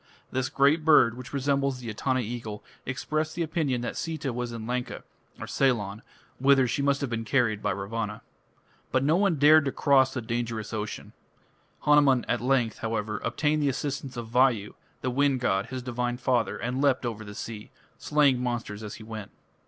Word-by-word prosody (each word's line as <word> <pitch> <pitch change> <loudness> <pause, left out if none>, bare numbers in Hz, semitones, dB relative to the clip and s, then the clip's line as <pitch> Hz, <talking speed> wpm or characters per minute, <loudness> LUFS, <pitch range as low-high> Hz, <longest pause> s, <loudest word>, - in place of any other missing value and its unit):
This 130 0 -1
great 145 +3 +3
bird, 150 -7 +5
which 125 +1 -9
resembles 140 -1 0
the 125 -2 -9
Etana 130 +4 0
eagle, 110 -2 -6 0.2
expressed 155 +4 -2
the 170 - 0
opinion 155 -7 -1
that 120 - -4
Sita 155 -6 -3
was 120 0 -3
in 115 -2 -6
Lanka 125 +1 -3 0.4
(Ceylon), 110 -6 0 0.4
whither 135 -1 +5
she 140 - -1
must 140 0 +1
have 140 - -2
been 115 -1 -2
carried 110 -2 +1
by - - 0
Ravana. 105 +2 -3 0.7
But 130 0 +2
no 150 +4 +3
one 195 -2 +3
dared 150 +2 +6
to 135 - 0
cross 135 -1 +3
the 130 - -2
dangerous 115 -2 -3
ocean. 105 -1 -5 0.7
Hanuman 145 -4 +4
at 120 - 0
length, 125 -3 +1
however, 105 -2 -2
obtained 150 0 0
the 145 - +2
assistance 135 -1 -4
of 120 -1 -5
Vayu, 120 -4 +2 0.3
the 125 - -1
wind 140 0 +2
god, 95 -5 0
his 130 -1 -5
divine 120 0 -2
father, 125 -2 0
and 125 +3 -2
leapt 135 -3 +2
over 110 -2 -4
the 105 -1 -9
sea, 110 -1 -7 0.3
slaying 145 -4 +3
monsters 120 -4 -3
as 105 -2 -6
he 110 - -11
went. 110 -2 -7
125 Hz, 180 wpm, -27 LUFS, 115-140 Hz, 0.7 s, dared